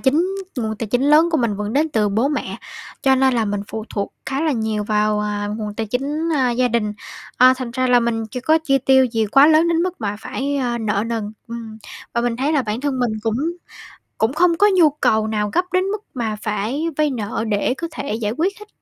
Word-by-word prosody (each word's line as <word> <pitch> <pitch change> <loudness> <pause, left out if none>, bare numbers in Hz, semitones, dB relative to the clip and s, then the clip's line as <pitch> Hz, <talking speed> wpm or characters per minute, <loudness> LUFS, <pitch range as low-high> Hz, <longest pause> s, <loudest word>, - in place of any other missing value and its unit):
chính 295 +7 +2 0.3
nguồn 220 -2 -2
tài 225 - -4
chính 245 +5 0
lớn 305 +4 +5
của 320 - +2
mình 225 -5 0
vẫn 210 +1 -3
đến 300 +5 +2
từ 215 -7 +1
bố 225 +7 +1
mẹ, 295 - -3 0.5
cho 265 -1 +4
nên 265 -1 +3
là 230 - +1
mình 205 -1 -2
phụ 220 -1 -5
thuộc 200 -1 -3
khá 270 +2 -2
là 315 - +1
nhiều 220 -3 -1
vào, 210 0 +1
à, 205 0 -2
nguồn 210 -2 -5
tài 225 +1 -3
chính, 285 +8 -2
a, 260 -3 +2
gia 250 +1 +1
đình. 215 -3 0 0.4
À, 255 +1 +7
thành 255 -2 -5
ra 255 +1 0
là 250 -1 +5
mình 225 -1 -1
chưa 250 - -5
có 315 +5 +3
chi 275 -2 +3
tiêu 265 0 +4
gì 225 -3 0
quá 275 +7 +6
lớn 320 +2 +5
đến 335 0 +2
mức 365 -3 -3
mà 205 -2 -2
phải, 280 +4 -3
a, 240 -3 -1
nợ 210 -1 -1
nần, 220 -3 -3 0.2
ừm, 225 -2 -7 0.4
và 235 - +2
mình 240 -1 -1
thấy 275 +5 0
là 290 -4 +2
bản 215 +1 -3
thân 275 -2 -1
mình 240 -3 0
cũng 225 0 0 0.8
cũng 225 +4 +1
không 335 +1 +3
có 410 +3 +5
nhu 335 -4 +6
cầu 220 -7 +1
nào 210 -1 -1
gấp 360 - +2
đến 370 - +3
mức 415 +2 -3
mà 225 -4 -2
phải 215 +8 -2
vay 305 -1 +2
nợ 220 -3 -3
để 210 +3 +1
có 335 - -3
thể 280 -8 -4
giải 215 -2 -2
quyết 360 - -1
hết. 420 - -12
245 Hz, 240 wpm, -20 LUFS, 220-285 Hz, 0.8 s, À